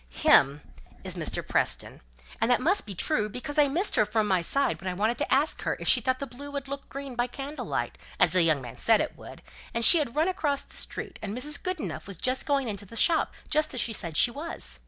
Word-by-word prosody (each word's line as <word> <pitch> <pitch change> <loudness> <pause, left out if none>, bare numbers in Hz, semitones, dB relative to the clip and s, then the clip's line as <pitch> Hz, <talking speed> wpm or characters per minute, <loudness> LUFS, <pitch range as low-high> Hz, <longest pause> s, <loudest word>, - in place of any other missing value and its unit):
"Him 140 - +4 0.4
is - - -5
Mr. - - -3
Preston. - - -1 0.4
And 225 - +2
that 245 - +4
must 350 - +1
be 200 - -6
true; 215 - 0
because 290 +7 -4
I 290 - +5
missed 345 +9 0
her - - +5
from 215 +1 0
my 185 -3 +2
side 170 - 0
when 190 - -3
I 180 - -4
wanted 220 +5 0
to 290 - -2
ask 285 +4 +3
her - - -2
if - - -5
she - - +6
thought 260 +1 -1
blue 285 +4 -9
would 280 -1 -5
look 280 0 -7
green 275 -1 -7
by 240 0 -1
candlelight, 245 - -5 0.2
as 165 - +4
the 185 +1 +4
young 155 -5 +2
man 120 -2 -9
said 225 -2 +3
it - - -3
would, - - -13 0.3
and 230 0 +5
she 340 - +10
had 270 -4 -3
run 315 +3 +2
across 305 -7 -1
the - - -15
street, - - -5
and 210 +2 -5
Mrs. 290 +3 -1
Goodenough 365 - -4
was 195 -3 -5
just 255 +6 -1
going 280 -3 +1
into 205 -2 -6
the 230 - -12
shop, 325 +8 +2 0.2
just 305 -2 0
as - - 0
she 230 - +1
said 170 -7 -3
she 240 - +4
was." 305 +7 0
250 Hz, 240 wpm, -27 LUFS, 205-285 Hz, 0.4 s, she